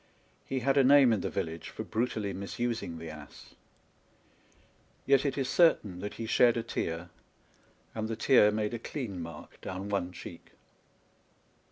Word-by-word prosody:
He 130 -1 -2
had 135 +3 +2
a 135 - +6
name 135 -2 +7
in 105 - 0
the - - -2
village 80 0 -4
for - - -6
brutally 110 -3 -2
misusing 105 -2 -3
the 80 -1 -7
ass; 75 -2 -12 1.5
yet 140 +1 +4
it 140 - -2
is 135 -2 0
certain 120 - +3
that 105 +2 -5
he 115 - -5
shed 120 +1 +4
a 115 - -1
tear, 85 -6 -4 0.8
and 110 0 -3
the 115 - -3
tear 110 -1 +5
made 105 +1 -1
a 120 - -3
clean 110 - -5
mark 85 -2 -10
down 95 +2 -5
one 95 -3 -1
cheek. 85 -1 -11
110 Hz, 160 wpm, -30 LUFS, 90-125 Hz, 1.5 s, name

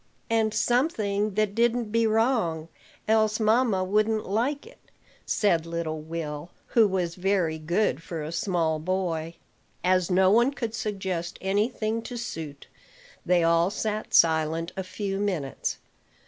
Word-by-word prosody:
"And 220 -1 +2
something 215 - 0
that 215 -1 +1
didn't 235 0 +1
be 230 0 +3
wrong, 215 -8 +1 0.4
else 215 0 +3
mamma 220 -3 +3
wouldn't 215 +3 +1
like 245 +9 -1
it," 470 - -16 0.5
said 170 -6 +1
little 165 -2 -3
Will, 155 0 -5 0.2
who 225 -3 +5
was 180 -3 -1
very 180 -3 0
good 170 +3 0
for 165 -2 -5
a 155 - -5
small 165 -3 0
boy. 170 -1 -2 0.5
As 185 -1 +2
no 185 +1 +4
one 240 +6 +4
could 230 -5 -4
suggest 190 -6 -3
any 205 +4 +1
thing 225 -2 -2
to 245 +1 -7
suit, 160 -11 -6 0.6
they 175 -1 +3
all 170 +1 +3
sat 215 +1 -3
silent 160 +1 +3
a 190 - -3
few 195 +1 -4
minutes. 180 -10 -2
195 Hz, 140 wpm, -26 LUFS, 170-220 Hz, 0.6 s, who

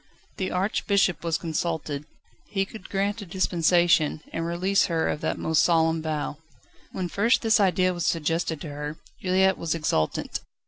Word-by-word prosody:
The 185 -1 -1
Archbishop 195 -1 +1
was 165 -1 0
consulted. 160 -3 -3 0.4
He 195 -2 -1
could 205 -1 -11
grant 200 +2 -1
a - - -7
dispensation, 170 -3 +2
and 165 0 -2
release 185 +4 +2
her 165 -2 0
of 150 - -2
that - - -1
most 160 -1 +2
solemn 165 -1 +3
vow. 155 -2 -3 0.5
When 185 -2 -3
first 230 +9 +2
this 225 0 +4
idea 185 -2 +3
was 175 -1 -3
suggested 165 -1 0
to 155 - -6
her, 150 +2 -5 0.2
Juliette 190 +1 +2
was 165 -1 -1
exultant. 150 - -1
170 Hz, 155 wpm, -26 LUFS, 160-190 Hz, 0.5 s, this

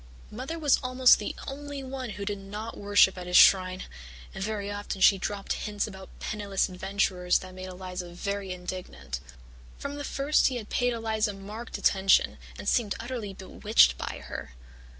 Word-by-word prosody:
Mother 260 +9 -5
was 295 -4 +3
almost 255 -1 +5
the - - -4
only 285 0 -6
one 260 -1 -5
who 200 - -4
did 205 0 -3
not 210 +3 -6
worship 200 -2 +4
at 180 - -7
his 180 - +4
shrine, 185 -1 +6 0.5
and 190 - -4
very 205 -1 -3
often 205 -1 -4
she 195 +1 +6
dropped 200 +1 -2
hints 205 -1 -2
about 190 -3 -10
penniless 205 -2 -1
adventurers 185 -1 +1
that 185 0 -8
made 185 0 -7
Eliza 180 -1 -6
very 195 +2 -4
indignant. 180 - -6 0.6
"From 280 +1 -5
the 290 - -4
first 280 +2 +2
he 260 - -1
had 225 -4 -6
paid 245 -1 +2
Eliza 220 -2 0
marked 210 +4 -7
attention 195 0 +3 0.2
and - - -7
seemed 220 -5 +2
utterly 230 -5 -5
bewitched 65 - +3
by - - -5
her. - - -7
200 Hz, 170 wpm, -28 LUFS, 185-235 Hz, 0.6 s, shrine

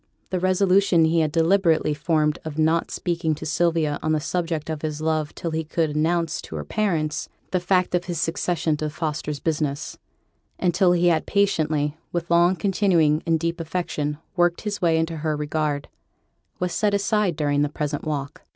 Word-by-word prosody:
The 185 - 0
resolution 185 -2 +3
he 165 +1 +2
had 155 -2 +1
deliberately 165 -1 +3
formed 150 0 +1
of 155 -1 -6
not 160 +1 +2
speaking 170 -3 -1
to 155 - -8
Sylvia 160 -1 +1
on 155 - 0
the 155 - +2
subject 165 0 -2
of 155 -2 -4
his 155 -1 -3
love 155 -1 -1
till 165 - -4
he 160 0 -1
could 160 0 -1
announce 160 +1 0
to - - -9
her - - -3
parents 160 -8 -1 0.2
the 185 - +2
fact 180 0 +1
of 175 0 +1
his 175 -3 -3
succession 165 -1 0
to 155 0 -2
Fosters' 150 -1 -3
business, 150 -2 -2 0.6
and 180 -2 +1
till 180 -2 +4
he 175 0 +3
had 160 -2 +1
patiently, 155 -7 +1
with 170 0 -3
long 175 +2 +5
continuing 180 -6 +2
and 165 -1 +2
deep 170 +1 -2
affection, 160 -3 -2 0.2
worked 175 -1 +2
his 205 -1 -4
way 165 -2 +3
into 160 0 -1
her 155 -1 -1
regard, 150 -1 -2 0.7
was 180 -1 -2
set 210 -1 +1
aside 200 -3 +1
during 145 -1 +1
the 145 - +1
present 150 0 -3
walk. 145 -3 -4
160 Hz, 180 wpm, -23 LUFS, 150-175 Hz, 0.7 s, long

